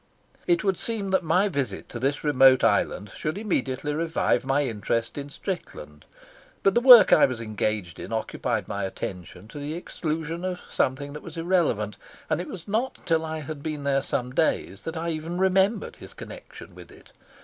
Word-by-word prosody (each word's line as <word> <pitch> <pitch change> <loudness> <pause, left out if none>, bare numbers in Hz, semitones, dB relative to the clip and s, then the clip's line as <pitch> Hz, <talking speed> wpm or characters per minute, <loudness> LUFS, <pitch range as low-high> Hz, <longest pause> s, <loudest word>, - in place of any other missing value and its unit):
It 345 -7 +3
would 195 -3 +1
seem 210 -4 -2
that 190 -1 +3
my 180 +5 +2
visit 135 - -3
to 120 - -6
this 135 +4 -1
remote 135 -3 +5
island 105 -1 +1
should 155 +4 -3
immediately 150 - -1
revive 160 +1 +1
my 135 +2 +1
interest 115 -1 -2
in 145 0 -6
Strickland, 195 - -7 0.6
but 195 - +4
the 240 - +3
work 245 -3 +9
I - - +7
was 130 -3 -5
engaged 105 -5 -3
in - - -7
occupied 110 -1 -2
my 100 - -3
attention 90 0 -6
to 145 - -8
the 145 +2 -4
exclusion 165 0 -4
of 185 -1 -3
something 140 +2 -1
that 150 - -7
was 170 -1 -10
irrelevant, 165 - 0 0.3
and - - +1
it 180 - -7
was 180 -1 -9
not 225 +6 -1
till 165 -1 +2
I 160 0 -4
had 155 -1 -7
been 150 -1 -4
there 140 -1 +2
some 125 -1 -3
days 115 - 0
that 165 0 -4
I 165 +1 -2
even 160 +2 -4
remembered 190 +3 +2
his - - -12
connection - - -11
with - - -13
it. - - -17
155 Hz, 185 wpm, -25 LUFS, 130-180 Hz, 0.6 s, work